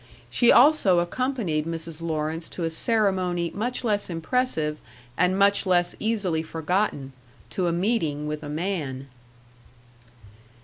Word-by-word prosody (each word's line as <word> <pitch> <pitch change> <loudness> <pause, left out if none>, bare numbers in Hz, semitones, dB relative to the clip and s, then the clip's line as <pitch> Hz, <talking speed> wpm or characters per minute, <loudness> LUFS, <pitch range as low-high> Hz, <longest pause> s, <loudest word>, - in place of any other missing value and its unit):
She 240 - +5
also 250 - +5
accompanied 175 - -1
Mrs. 165 -1 -5
Lawrence 160 0 -3
to 175 - -5
a 165 - -1
ceremony 185 -4 0
much 245 +5 -2
less 205 -4 0
impressive 165 -3 -1 0.4
and 180 +4 +2
much 200 0 +3
less 175 -1 +2
easily 205 -7 0
forgotten 160 -3 -2 0.4
to 185 -2 -1
a - - +1
meeting 170 -6 0
with 150 0 -4
a 150 - -7
man. 150 -5 -3
175 Hz, 125 wpm, -25 LUFS, 160-205 Hz, 0.4 s, She